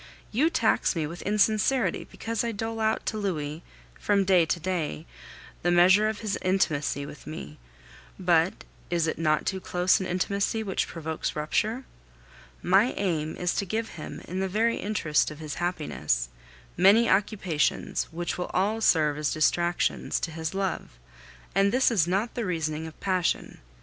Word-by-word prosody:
You 280 +9 +3
tax 280 - +2
me 160 -2 0
with 170 +4 -7
insincerity 215 +5 +1
because 225 -1 -3
I 235 - -1
dole 225 +1 -4
out 220 0 0
to 215 - -2
Louis, 155 -6 -3 0.4
from 200 -1 +2
day 180 -3 +4
to 170 - 0
day, 160 - -3 0.6
the 175 - +1
measure 185 +5 +5
of 220 - -5
his 215 -3 -2
intimacy 150 -7 0
with 145 - -11
me; 75 - -8 0.6
but 175 -1 +2 0.3
is 170 -2 +1
it 160 - -2
not 155 -2 +1
too 190 - -1
close 180 +1 +2
an 190 - -3
intimacy 200 +4 -1
which 195 -3 -1
provokes 160 -1 -4
rupture? 215 - -1 0.8
My 195 +7 +4
aim 160 -5 -2
is 180 0 0
to - - +1
give 220 +4 -2
him, 155 - -8
in 185 +2 -4
the 190 0 -1
very 225 +4 +1
interest 185 -8 +1
of 150 - -9
his 155 -1 -6
happiness, 75 - -1 0.5
many 200 +6 +6
occupations, 190 -5 0
which 175 +2 -4
will 180 - -3
all 210 +4 +1
serve 150 -7 +3
as 150 -1 0
distractions 175 +3 +1
to 165 - -2
his 160 +2 -4
love; 195 -2 -3 0.6
and 195 +1 +3
this 255 +1 +3
is 185 -8 +2
not 195 +6 0
the 240 - -3
reasoning 160 -4 -2
of 160 - -12
passion. 185 -3 -1
180 Hz, 165 wpm, -27 LUFS, 160-210 Hz, 0.8 s, many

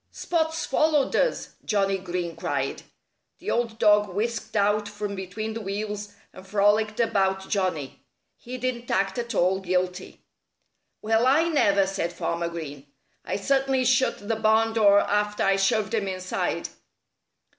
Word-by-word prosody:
"Spot's 320 -1 -1
followed 295 -1 +2
us!" - - +1
Johnnie 195 -2 +1
Green 175 -2 -4
cried. - - -2 0.6
The - - -4
old 230 -2 -1
dog 210 -2 +4
whisked 225 +4 -3
out 205 0 +2
from 205 -1 -5
between 200 +3 -5
the 225 - -5
wheels 205 0 -4 0.2
and 185 - -12
frolicked 210 +2 +2
about 190 -4 +1
Johnnie. 180 -9 -2 0.3
He 250 +1 -8
didn't 245 -1 -3
act 195 +3 0
at 235 -1 -4
all 185 +2 +2
guilty. 180 0 -2 0.8
"Well, 225 +3 +2
I 315 +6 +4
never!" 200 -11 +3
said 190 -3 -3
Farmer 170 0 -2
Green. 145 -4 -8 0.4
"I - - -3
certainly 270 +4 +1
shut 250 -4 +1
the 225 - +1
barn 220 +1 +2
door 205 -2 +5
after 210 0 0
I 195 0 +3
shoved 195 +2 +1
him 210 -3 0
inside." 185 -1 -2
205 Hz, 145 wpm, -25 LUFS, 190-230 Hz, 0.8 s, door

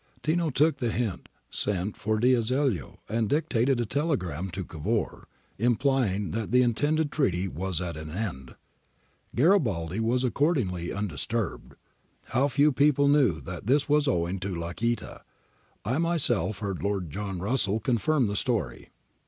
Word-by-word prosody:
Tino 165 +1 +1
took 150 +3 +2
the 120 - -1
hint, 110 -5 -3 0.2
sent 100 0 -1
for 110 +1 -1
D'Azeglio 125 - +1
and 110 -1 0
dictated 135 -3 +1
a 120 - +1
telegram 105 - -1
to 95 +2 -4
Cavour, 100 +9 -3 0.3
implying 120 - +1
that 110 -2 -3
the 125 +3 +5
intended 145 +6 +1
treaty 95 - +1
was 95 -1 -2
at 85 -3 -4
an 75 0 -7
end. 80 - -5 0.8
Garibaldi 115 - +2
was 120 +3 +1
accordingly 125 - 0
undisturbed. 100 +2 -3 0.5
How 135 +3 +2
few 145 +2 +3
people 140 +1 +3
knew 130 - +3
that 85 - -7
this 145 +4 +3
was 150 0 +3
owing 90 -5 0
to 95 0 -3
Lacaita, 90 +8 -3 0.6
I 125 +8 0
myself 140 - +1
heard 100 -4 -3
Lord 95 -6 -2
Russell 100 +2 -1
confirm 125 +5 +1
this 100 -1 0
story.' 110 - -2
115 Hz, 135 wpm, -27 LUFS, 95-135 Hz, 0.8 s, the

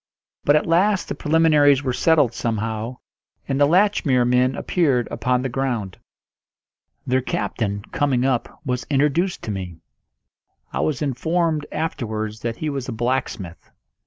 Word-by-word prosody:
But 145 - +5
at 150 - +2
last 185 +4 +2
the - - -1
preliminaries 150 -3 +4
were 130 -2 -1
settled 145 -5 +3
somehow, 115 0 -3 0.5
and 135 +1 -1
the 145 - +6
Latchmere 165 -8 +3
men 125 +2 +2
appeared 140 -9 +1
upon 125 0 0
the - - 0
ground. 120 -7 -3 1.1
Their 130 +1 +1
captain, 100 -5 -2
coming 130 -3 +1
up, 130 +5 -1
was 125 -1 -2
introduced 150 +6 +1
to 110 - -3
me. 90 -4 -5 1.0
I - - -2
was 150 -2 0
informed 155 +3 0
afterwards 110 -9 -3
that 115 -1 -3
he 155 - -4
was 135 -3 -4
a - - -2
blacksmith. 115 -6 -3
130 Hz, 140 wpm, -22 LUFS, 120-150 Hz, 1.1 s, the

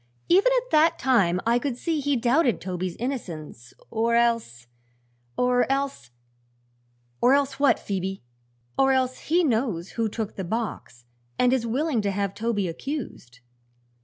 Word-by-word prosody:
Even 395 +8 +5
at - - -3
that 325 +2 +4
time 200 - +2
I 235 +1 +3
could 255 -2 -3
see 325 +2 -1
he 285 0 0
doubted 250 +1 +2
Toby's 180 -1 -4
innocence, 165 - -6 0.2
or 230 +1 +1
else 230 - 0 0.7
or 250 +1 +2
else 275 - -2 0.6
" 120 0 -41
"Or 255 +3 +5
else 280 -1 0
what, 285 -1 +4
Phoebe?" 195 -3 -4 0.6
"Or 270 0 +5
else 255 -1 0
he 345 +3 +1
knows 225 - 0
who 225 -2 -1
took 220 0 -5
the 190 - -3
box 190 - -5 0.3
and 250 0 +3
is 240 -3 0
willing 260 +1 0
to 205 - -1
have 200 0 -2
Toby 210 -2 -1
accused." 165 - -6
235 Hz, 150 wpm, -25 LUFS, 185-270 Hz, 0.7 s, Even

